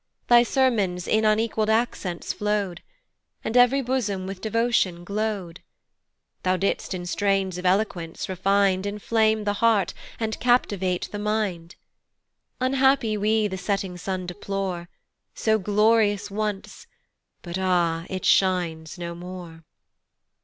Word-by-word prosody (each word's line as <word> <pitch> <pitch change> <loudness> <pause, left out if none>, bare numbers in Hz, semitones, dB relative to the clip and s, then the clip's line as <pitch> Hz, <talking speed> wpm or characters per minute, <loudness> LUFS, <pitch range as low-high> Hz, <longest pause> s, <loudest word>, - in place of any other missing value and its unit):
Thy 240 0 +8
sermons 225 -9 +1
in 220 0 +2
unequall'd 215 0 +1
accents 220 -6 -1
flow'd, 205 -3 -2 0.6
And 225 - -3
ev'ry 250 +2 +5
bosom 220 -7 -1
with 190 0 -6
devotion 220 -6 +1
glow'd; 200 -3 -3 0.8
Thou 185 0 +1
didst 195 0 -1
in 175 -1 -5
strains 195 0 0
of 180 - -1
eloquence 180 -4 -1
refin'd 195 +1 +1
Inflame 220 +1 +1
the 205 0 0
heart, 225 -4 +3 0.3
and 220 -1 -2
captivate 200 -7 +1
the 205 - -5
mind. 205 -5 -2 0.8
Unhappy 265 -3 +2
we 215 +1 +2
the 190 -2 -5
setting 195 -1 -2
sun 185 +1 -4
deplore, 180 -1 -4 0.5
So 220 -1 +2
glorious 210 0 +2
once, 210 -1 -4 0.6
but 175 +1 -4
ah! 175 -3 +1
it 185 0 -4
shines 175 -3 +1
no 170 -1 -5
more. 175 -2 -9
200 Hz, 120 wpm, -24 LUFS, 180-220 Hz, 0.8 s, Thy